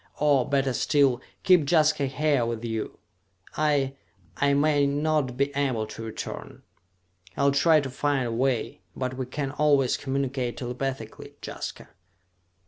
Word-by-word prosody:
Or, 145 -4 +2
better 135 -2 +1
still, 135 -1 +2 0.2
keep 175 -6 +4
Jaska 155 -4 +3
here 140 -1 +1
with 115 0 -3
you! 110 -1 -4 0.6
I... 145 -3 +1 0.4
I 140 0 +2
may 145 -1 +3
not 145 -3 0
be 140 +1 0
able 130 -6 0
to 110 - -9
return! 110 -1 -7 0.7
I'll 140 0 +3
try 155 +2 +4
to 135 - -5
find 140 0 0
a 120 - -2
way, 120 -5 -1
but 130 -1 -3
we 130 -1 -4
can 140 +1 -3
always 145 -3 +2
communicate 135 -2 -2
telepathically. 125 -2 -5
Jaska...." - - -6
135 Hz, 135 wpm, -26 LUFS, 125-145 Hz, 0.7 s, keep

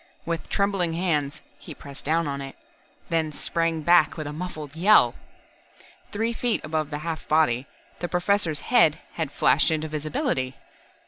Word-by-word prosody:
With 165 -1 -3
trembling 195 -4 +1
hands, 155 -5 -1 0.2
he - - -10
pressed 140 -1 -11
down 165 +2 +1
on 140 -1 -3
it 135 0 -8 0.5
then 160 -2 0
sprang 165 +1 -1
back 170 -2 +4
with 155 - -4
a 145 - -5
muffled 155 -3 -6
yell. 170 - +5 1.0
Three 225 +3 -1
feet 235 0 -1
above 155 -1 -2
the 145 - -3
half 165 -2 -4
body, 140 -5 +2 0.3
the 175 - -3
Professor's 180 -4 +1
head 195 -11 +4 0.2
had 160 -4 -3
flashed 145 0 +3
into 155 -1 -1
visibility. 145 -4 -2
160 Hz, 150 wpm, -25 LUFS, 150-175 Hz, 1.0 s, yell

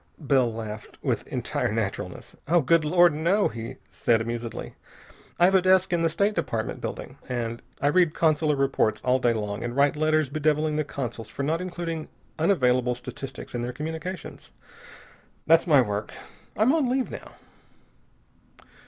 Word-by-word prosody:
Bell 135 -5 +2
laughed 110 -1 -7
with - - -1
entire - - -2
naturalness. - - -4 0.3
"Good 165 +3 +4
Lord, 175 +1 +5
no!" 175 +7 +2
he 115 +1 -7 0.2
said 115 -1 +2
amusedly. 115 0 -5 0.6
"I 175 - +5
have 190 - +4
a 190 - +5
desk 185 0 +3
in 170 - +2
the 165 - +3
State 200 +6 +1
Department 125 - -3
building, - - -6
and 120 -2 -3 0.2
I - - +2
read 160 +2 +3
consular 155 -2 +2
reports 135 -5 +1
all 130 +1 +2
day 120 -2 +2
long 105 -1 -3
and 120 0 -4
write 140 +1 +3
letters 155 -2 +1
bedeviling 155 0 +1
the 155 - +1
consuls 120 -6 -5
for 140 - -5
not 160 +4 0
including 170 -3 -4 0.3
unavailable 125 -8 +2
statistics 130 +2 -8
in 120 - -2
their 120 +1 -3
communications. 160 +5 -6 1.0
That's 165 +2 +4
my 145 -5 +6
work. 105 -1 -3 0.5
I'm 220 +7 +4
on 300 -6 +2
leave 260 0 0
now." - - -9
150 Hz, 155 wpm, -26 LUFS, 120-170 Hz, 1.0 s, my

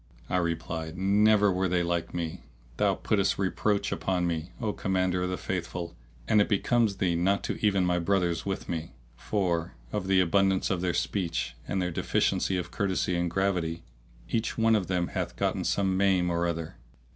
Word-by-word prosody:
I 90 - +2
replied, 80 -1 -2
"Never 105 +2 +4
were 95 +1 +1
they 90 0 +1
like 85 -1 -1
me! 85 -2 -4 0.4
Thou - - +2
puttest 100 -2 +1
reproach 100 +2 0
upon 90 -2 0
me, 85 0 -2
O 110 -3 -1
Commander 95 -2 0
of 90 - -1
the 90 - -2
Faithful, 85 -2 -4 0.3
and 105 - +5
it - - +1
becomes 110 +1 +2
thee 90 -3 +1
not 95 +4 +1
to - - -4
even 100 -3 +3
my 90 0 +2
brothers 85 -2 +1
with 95 -1 -3
me; 80 -5 -4 0.2
for, 85 - -1 0.2
of 100 -3 -2
the 95 -1 +4
abundance 95 +1 +2
of 90 -2 0
their 90 -2 0
speech 85 -8 -1
and 95 - -1
their 90 -1 -1
deficiency 95 +3 +1
of 85 -1 -4
courtesy 95 -2 0
and 85 0 0
gravity, 85 -3 -1 0.4
each 110 - -1
one 115 0 +4
of 100 -4 0
them 90 -2 0
hath - - -3
gotten - - 0
some 95 -2 +1
maim 95 -2 +2
or 85 0 +1
other. 85 -2 -4
90 Hz, 180 wpm, -28 LUFS, 85-100 Hz, 0.4 s, and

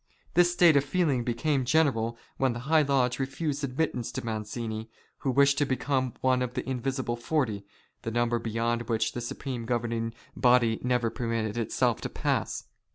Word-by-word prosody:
This 175 0 +5
state 175 -3 +5
of 140 - +5
feeling 145 -5 +1
became 130 +4 0
general 120 -5 +2 0.2
when 130 -2 +2
that 120 - -6
high 155 +4 +4
lodge 135 -3 +1
refused 140 +2 -2
admittance 130 -3 -1
to - - -4
Mazzini, 110 0 -4 0.3
who 135 - -1
wished 140 +2 +4
to 145 - +3
become 130 -1 0
one 130 -1 +3
of 125 0 -3
the 125 - -3
invisible 130 -1 -2
forty 120 -6 -1 0.2
— - - -39
the - - -3
number 120 +1 +1
beyond 115 +1 -1
which 110 -2 +1
the 120 - -5
supreme 120 0 -4
governing 115 -1 -1 0.2
body 120 -3 +4
never 125 -2 +1
permitted 115 -2 -2
itself 115 -2 0
to - - -3
pass. - - -1
125 Hz, 170 wpm, -28 LUFS, 115-135 Hz, 0.3 s, This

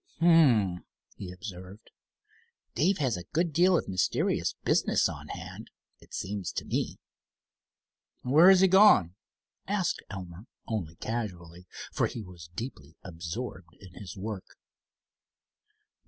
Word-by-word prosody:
"H'm," 130 - +4 0.3
he 90 -2 -7
observed, 95 +1 -10 0.8
"Dave 180 +10 +2
has 130 -9 0
a 90 - -7
good 165 0 +1
deal 180 +3 +5
of - - -3
mysterious 95 -1 0
business - - +2
on - - -8
hand, - - -8 0.3
it - - -20
seems 95 -2 -4
to - - -4
me." - - -2 1.3
"Where 155 +8 +6
has 190 -1 +7
he 190 - +7
gone?" 190 - +6 0.5
asked 195 -2 0
Elmer 95 +1 -8 0.2
only 90 -8 -4
casually, 90 -6 -5 0.3
for - - +1
he 115 - -7
was 90 -4 -12
deeply 85 - -7
absorbed 90 +1 -7
in 95 -3 -14
his 95 0 -9
work. 100 -1 -7
100 Hz, 125 wpm, -29 LUFS, 90-150 Hz, 1.3 s, has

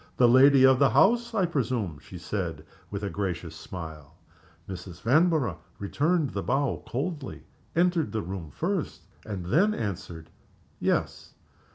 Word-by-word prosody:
"The 125 - +6
lady 130 +2 +7
of 130 -1 +5
the 140 -2 +5
house, 230 - +3
I 195 -4 +3
presume?" 120 - -2
she 90 +6 -11
said, 85 -3 -4 0.2
with 100 0 -5
a 100 - -1
gracious 85 -3 -3
smile. 80 -4 -9 0.5
Mrs. 90 -2 -8
Vanborough 155 - +2 0.2
returned 150 - 0
the 100 - -3
bow 135 +3 0
coldly 145 +1 -4 0.3
entered 170 - +2
the 110 -1 -2
room 90 -3 -6
first 180 - -3 0.3
and 100 -5 -5
then 200 - +3
answered, 85 -6 -5 0.5
"Yes." - - -1
115 Hz, 140 wpm, -27 LUFS, -, 0.5 s, lady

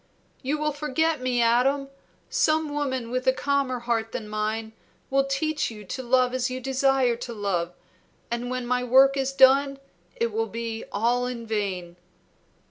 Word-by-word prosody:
"You 285 +3 -1
will 300 0 0
forget 300 +1 0
me, 250 -2 +1
Adam. 265 +4 +2 0.4
Some 310 0 +1
woman 260 -5 -2
with 255 +1 -2
a - - +7
calmer 275 -2 -1
heart 230 -2 -1
than 215 - -4
mine 215 +1 -3 0.4
will 275 0 +3
teach 295 +2 -1
you 210 -3 -10
to 260 - -5
love 255 0 +2
as 255 0 0
you 255 0 -4
desire 265 -1 +2
to 240 0 -6
love, 180 -5 -2 0.6
and 240 +1 -2
when 255 -1 -3
my 250 +1 0
work 265 +3 +5
is 270 -1 0
done 275 +1 +5 0.4
it 235 0 -1
will 225 +1 -1
be 230 0 -5
all 240 +4 +1
in 240 -2 -5
vain." 190 -5 -3
250 Hz, 165 wpm, -25 LUFS, 230-275 Hz, 0.6 s, a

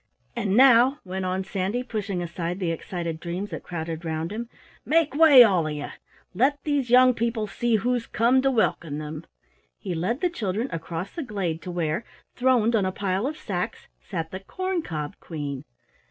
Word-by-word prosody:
"And 195 +2 0
now," 260 +1 +6
went 185 0 -4
on 185 +1 -1
Sandy, 195 +5 -2
pushing 205 -7 -3
aside 175 +1 -4
the 175 -4 0
excited 165 -1 -4
dreams 180 +4 -4
that - - -5
crowded 165 -1 -5
round 160 +1 -3
him, 230 +2 -5 0.3
"make 315 -3 +2
way, 290 -4 +9
all 185 -8 +2
of 155 - -3
you! 145 -1 -5 0.4
Let 265 +9 +2
these 285 -5 0
young 255 +1 +7
people 230 -1 -1
see 230 +3 0
who's 240 +2 0
come 245 +4 +3
to 270 - +2
welcome 170 - 0
them." 155 0 -7 0.5
He 185 - -5
led 185 - -1
the 360 - +2
children 220 - -2
across 165 +3 -5
the 335 - -4
glade 190 - -3
to - - -7
where, 170 +2 -1 0.3
throned 245 -3 +3
on 210 - +2
a - - -1
pile 195 +4 -1
of 305 +2 -4
sacks, 180 -4 -4
sat 160 - -5
the 190 - -5
Corn 370 - -3
cob 155 - -5
Queen! 145 -5 -5
195 Hz, 185 wpm, -25 LUFS, 170-245 Hz, 0.5 s, way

